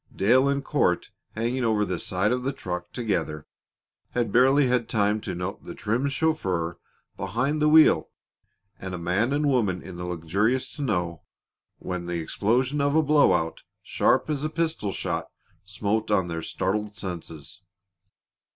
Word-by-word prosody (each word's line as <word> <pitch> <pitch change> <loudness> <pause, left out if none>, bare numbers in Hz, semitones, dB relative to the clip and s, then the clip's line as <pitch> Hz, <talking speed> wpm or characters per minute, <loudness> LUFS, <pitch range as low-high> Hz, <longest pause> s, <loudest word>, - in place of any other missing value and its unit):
Dale 125 +8 +4
and 140 0 -1
Court, 90 - +1 0.2
hanging 120 +3 -1
over 110 -2 +2
the 90 -2 -3
side 100 +3 0
of 125 0 0
the 135 +2 -1
truck 90 -6 -5
together, 90 - -2 0.7
had 120 -4 0
barely 135 +4 +5 0.2
time 105 0 +1
to 90 - -4
note 90 +3 -5
the - - -8
trim 115 +7 0
chauffeur 95 - -1 0.4
behind 125 +11 -1
the 150 - +4
wheel 155 - +6 0.7
and 95 -1 -5
a - - -4
man 90 +8 0
and 145 +1 +1
woman 105 -10 +1
in 90 -2 -9
the 90 - -5
luxurious 95 +9 -1
tonneau 90 - -2 0.6
when 90 -1 -5
the 85 0 -2
explosion 125 - 0
of 140 +1 +1
a 160 - +5
blow 150 -6 +5
out, 80 -2 -1 0.2
sharp - - +2
as 150 -2 -2
a 155 - 0
pistol 160 -10 -1
shot, 80 -3 -3 0.4
smote 105 +2 -1
on 95 -4 +2
their 80 -1 -3
startled 105 +5 -2
senses. 85 -6 -7
105 Hz, 155 wpm, -26 LUFS, 90-130 Hz, 0.7 s, wheel